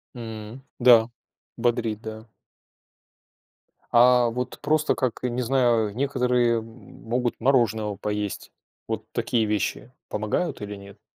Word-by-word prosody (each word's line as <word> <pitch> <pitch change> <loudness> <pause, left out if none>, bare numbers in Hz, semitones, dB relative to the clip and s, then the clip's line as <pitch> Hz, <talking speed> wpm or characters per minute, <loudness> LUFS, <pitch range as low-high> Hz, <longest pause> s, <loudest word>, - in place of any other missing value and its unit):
М, 110 +1 -8 0.2
да, 120 -2 +6 0.5
бодрит, 115 -3 0
да. 110 0 -8 1.6
А 125 0 +5
вот 125 +2 -4
просто 155 +1 +2
как, 130 -3 -2
и 125 - 0
не 120 +1 -2
знаю, 120 -3 +2
э, - - -10
некоторые, 125 -2 +1
м, 110 - -9 0.4
могут 120 0 -1
мороженого 110 -5 +2
поесть. 105 0 -4 0.4
Вот - - -3
такие 115 -2 0
вещи 105 +3 -2 0.2
помогают 110 - -2
или 105 0 -5
нет? 100 +1 -13
115 Hz, 125 wpm, -25 LUFS, 110-125 Hz, 1.6 s, да